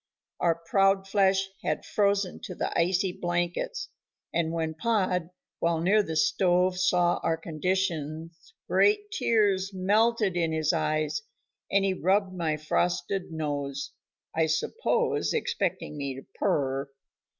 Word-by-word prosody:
Our 170 Hz, -2 st, +2 dB
proud 195 Hz, +3 st, +2 dB
flesh 195 Hz, -1 st, +3 dB, 0.2 s
had -, -, -1 dB
frozen 200 Hz, -2 st, +1 dB
to -, -, -7 dB
the -, -, -3 dB
icy 180 Hz, +2 st, +2 dB
blankets, 175 Hz, -, -2 dB, 0.4 s
and 165 Hz, -1 st, 0 dB
when 160 Hz, -1 st, -2 dB
Pod, 180 Hz, -2 st, 0 dB, 0.3 s
while 170 Hz, -1 st, +1 dB
near 195 Hz, +6 st, +4 dB
the 160 Hz, -5 st, -4 dB
stove 180 Hz, +3 st, +2 dB
saw 180 Hz, -1 st, +3 dB
our 165 Hz, -, 0 dB
conditions 165 Hz, -, -3 dB
great 415 Hz, 0 st, +3 dB
tears 205 Hz, -, +2 dB
melted 210 Hz, +1 st, +2 dB
in 165 Hz, -2 st, 0 dB
his 155 Hz, +1 st, +1 dB
eyes, 155 Hz, +1 st, 0 dB, 0.5 s
and 195 Hz, 0 st, +3 dB
he 195 Hz, -, +2 dB
rubbed 190 Hz, +1 st, +1 dB
my 165 Hz, -4 st, -1 dB
frosted 175 Hz, +4 st, -1 dB
nose, 145 Hz, -3 st, -3 dB, 0.4 s
I 160 Hz, 0 st, +2 dB
suppose 300 Hz, -, 0 dB
expecting 185 Hz, -, -2 dB
me 140 Hz, -2 st, -3 dB
to 135 Hz, -, -10 dB
purr. 135 Hz, 0 st, 0 dB
175 Hz, 130 wpm, -28 LUFS, 160-195 Hz, 0.5 s, near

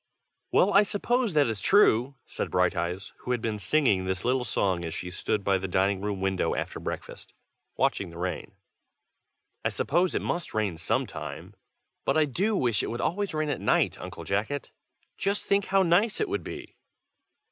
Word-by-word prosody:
"WELL, 200 Hz, +2 st, +4 dB
I 200 Hz, -, +8 dB
suppose 225 Hz, +2 st, 0 dB
that 150 Hz, -2 st, +4 dB
is 110 Hz, -5 st, -3 dB
true!" 135 Hz, -, +4 dB
said -, -, -4 dB
Brighteyes, 90 Hz, +1 st, 0 dB
who -, -, -9 dB
had 125 Hz, -1 st, +1 dB
been 110 Hz, -2 st, -2 dB
singing 105 Hz, -2 st, +2 dB
this 95 Hz, +1 st, -2 dB
little 125 Hz, +1 st, +2 dB
song 95 Hz, -6 st, 0 dB
as 80 Hz, 0 st, -4 dB
she 90 Hz, +1 st, -5 dB
stood 100 Hz, +3 st, -1 dB
by 95 Hz, -1 st, +2 dB
the 95 Hz, -, -3 dB
dining 95 Hz, +1 st, +1 dB
room 100 Hz, -1 st, -2 dB
window 95 Hz, -1 st, 0 dB
after -, -, -3 dB
breakfast, -, -, -7 dB, 0.4 s
watching 95 Hz, -, +1 dB
the 85 Hz, -, -11 dB
rain. 90 Hz, +1 st, -4 dB, 1.1 s
"I -, -, +2 dB
suppose 180 Hz, +1 st, +1 dB
it -, -, 0 dB
must 175 Hz, -8 st, -3 dB
rain 105 Hz, -6 st, 0 dB
some 80 Hz, -, 0 dB
time. -, -, -7 dB, 0.5 s
But -, -, +1 dB
I 155 Hz, -, +5 dB
do 195 Hz, -, 0 dB
wish 120 Hz, -, +1 dB
it -, -, -3 dB
would 120 Hz, -, -4 dB
always 195 Hz, +3 st, -1 dB
rain 155 Hz, -1 st, 0 dB
at -, -, -2 dB
night, -, -, +2 dB
Uncle -, -, -7 dB
Jacket. 110 Hz, +8 st, -2 dB, 0.5 s
Just 200 Hz, +1 st, 0 dB
think 200 Hz, 0 st, +2 dB
how 195 Hz, 0 st, +3 dB
nice 190 Hz, +5 st, +3 dB
it 425 Hz, -, 0 dB
would 400 Hz, -, -2 dB
be!" -, -, -8 dB
115 Hz, 185 wpm, -27 LUFS, -, 1.1 s, I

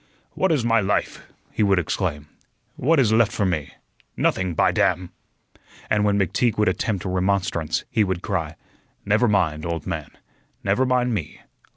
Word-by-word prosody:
"What 190 Hz, -2 st, 0 dB
is 140 Hz, -7 st, +1 dB
my 115 Hz, -1 st, +3 dB
life!" 100 Hz, 0 st, -2 dB, 0.2 s
he -, -, -2 dB
would 100 Hz, -2 st, +3 dB
exclaim. 80 Hz, -3 st, -2 dB, 0.5 s
"What 160 Hz, +4 st, +2 dB
is 110 Hz, -5 st, +3 dB
left 115 Hz, -1 st, +4 dB
for 100 Hz, -, -1 dB
me? 80 Hz, -6 st, -2 dB, 0.4 s
Nothing, 95 Hz, -3 st, 0 dB
by -, -, +3 dB
damn!" 90 Hz, 0 st, 0 dB, 0.8 s
And 105 Hz, -1 st, +3 dB
when 100 Hz, -1 st, +2 dB
McTeague 100 Hz, +4 st, +1 dB
would 105 Hz, 0 st, +2 dB
attempt 100 Hz, -6 st, -2 dB
remonstrance, 95 Hz, -3 st, 0 dB
he 110 Hz, -, +3 dB
would 95 Hz, -2 st, -2 dB
cry: 85 Hz, -5 st, -2 dB, 0.5 s
"Never 105 Hz, +4 st, +3 dB
mind, 80 Hz, -7 st, +1 dB
old 85 Hz, -1 st, -3 dB
man. -, -, -4 dB, 0.5 s
Never 105 Hz, +7 st, +1 dB
mind 125 Hz, -1 st, +1 dB
me. 85 Hz, -9 st, -5 dB
100 Hz, 160 wpm, -23 LUFS, 90-110 Hz, 0.8 s, left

